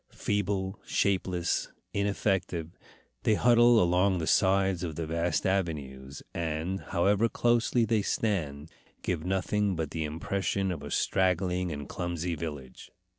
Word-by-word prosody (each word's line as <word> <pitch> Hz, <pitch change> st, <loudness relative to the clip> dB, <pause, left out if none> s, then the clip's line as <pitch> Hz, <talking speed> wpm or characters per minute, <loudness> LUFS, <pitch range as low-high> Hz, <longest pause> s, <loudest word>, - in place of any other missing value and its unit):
Feeble, 100 Hz, -1 st, -2 dB
shapeless, 90 Hz, -3 st, 0 dB, 0.2 s
ineffective, 95 Hz, -5 st, -1 dB, 0.5 s
they 110 Hz, -, +3 dB
huddle 120 Hz, 0 st, +5 dB
along 90 Hz, +1 st, +3 dB
the 80 Hz, -, -2 dB
sides 95 Hz, 0 st, +3 dB
of 80 Hz, -3 st, -4 dB
the 85 Hz, -, -3 dB
vast 85 Hz, +1 st, -1 dB
avenues, 70 Hz, -8 st, -2 dB
and, 85 Hz, +3 st, -2 dB
however 100 Hz, +6 st, +1 dB
closely 120 Hz, 0 st, +2 dB
they 110 Hz, -1 st, +2 dB
stand, 80 Hz, -9 st, -2 dB, 0.3 s
give 85 Hz, -4 st, -1 dB
nothing 95 Hz, +2 st, 0 dB
but 80 Hz, -3 st, -3 dB
the 80 Hz, -, -2 dB
impression 95 Hz, +5 st, -1 dB
of 85 Hz, -, -5 dB
a -, -, -7 dB
straggling 90 Hz, -1 st, +1 dB
and 70 Hz, -2 st, -5 dB
clumsy 85 Hz, -1 st, -3 dB
village. 75 Hz, -5 st, -7 dB
90 Hz, 125 wpm, -29 LUFS, 80-100 Hz, 0.5 s, huddle